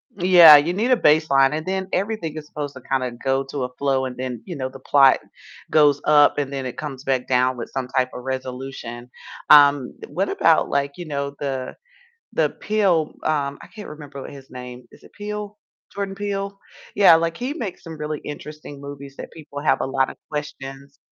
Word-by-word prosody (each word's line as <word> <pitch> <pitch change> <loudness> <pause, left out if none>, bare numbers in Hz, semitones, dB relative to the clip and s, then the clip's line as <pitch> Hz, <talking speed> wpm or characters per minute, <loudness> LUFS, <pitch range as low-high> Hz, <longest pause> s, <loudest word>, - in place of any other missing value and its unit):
Yeah, 175 -5 +9
you 165 +5 +1
need 230 +6 0
a - - +7
baseline, 150 - +4
and 155 - -4
then 190 0 -2
everything 185 -6 -2
is 150 - -8
supposed 145 -2 -5
to 130 - -10
kinda 130 -1 -1
go 135 0 +1
to 140 -3 -3
a 125 - -9
flow 135 -1 0
and 125 -1 -5
then, 125 -3 -5
you 175 - -6
know, 130 -1 -3
the 135 0 -12
plot 135 0 +5 0.5
goes 145 -2 +4
up 145 -1 +5
and 140 -1 -2
then 135 -1 -4
it 125 - -6
comes 140 -3 -6
back 130 -2 -1
down 125 0 +2
with 115 - -6
some 130 -2 -3
type 130 -1 0
of 125 - -8
resolution. 130 -2 -6 0.4
Um, 145 -3 +6
what 185 +7 -2
about, 165 0 +3
like, 140 0 0
you 175 - -7
know, 140 -1 -4
the 135 -2 -4 0.6
the - - +2
Peele 190 -7 0
um, 145 -2 -1
I - - -11
can't 210 -2 -9
remember 145 -2 -9
what - - -8
his 135 -1 -13
name. 125 -1 -9
Is - - -19
it - - -18
Peele? 210 0 -6 0.4
Jordan 200 -1 -3
Peele? 200 0 -4 0.4
Yeah, 190 -5 +7
like, 165 0 -1
he 250 +4 -3
makes 220 - -6
some 160 -2 -9
really 150 0 -4
interesting 150 -1 -9
movies 140 -1 -9
that - - -8
people 145 -3 -9
have 155 - +2
a - - -1
lot 135 0 +1
of - - -9
questions. 140 -2 -7
145 Hz, 200 wpm, -22 LUFS, 135-165 Hz, 0.6 s, Yeah